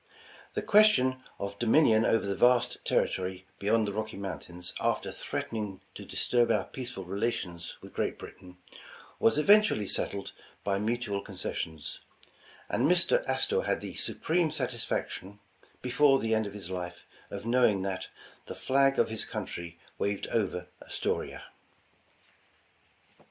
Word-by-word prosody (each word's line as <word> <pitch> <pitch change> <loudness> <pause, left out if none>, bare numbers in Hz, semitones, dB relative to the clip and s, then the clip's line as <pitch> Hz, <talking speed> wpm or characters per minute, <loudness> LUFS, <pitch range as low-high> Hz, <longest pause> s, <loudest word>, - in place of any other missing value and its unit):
The - - -1
question 130 -12 +5 0.2
of 100 0 -5
dominion 115 -2 +5
over 115 - +3
the 100 0 -1
vast 125 +2 +3
territory 95 0 0
beyond 110 +2 +2
the 100 - -3
Rocky 110 -1 -4
Mountains, 90 -2 -6
after - - 0
threatening 105 -4 -4
to - - -9
disturb 120 -1 +2
our - - +3
peaceful 125 -6 -6
relations 95 -3 -2
with - - -11
Great - - -1
Britain, 90 0 -12 0.6
was 115 - +4
eventually 205 - +5
settled 100 +1 -1 0.3
by 100 -1 0
mutual 105 -2 -1
concessions, 90 -5 -5 0.7
and - - +2
Mr. 185 - +3
Astor 465 +2 +1
had - - 0
the - - -6
supreme 165 0 0
sat 145 -5 -2
isfaction, 105 -4 -4 0.5
before 135 +2 +5
the 115 -3 0
end 110 -1 +1
of 100 - -8
his 95 -3 -7
life, 90 -1 -5 0.2
of 100 +1 -6
knowing 115 -5 +3
that 95 -1 -3 0.4
*'the - - -6
flag 135 +1 +3
of - - +3
his 110 -1 -1
country 85 -6 -6 0.2
waved 100 -1 -1
over 90 -5 0 0.2
Astoria." - - -3
110 Hz, 135 wpm, -30 LUFS, 95-125 Hz, 0.7 s, question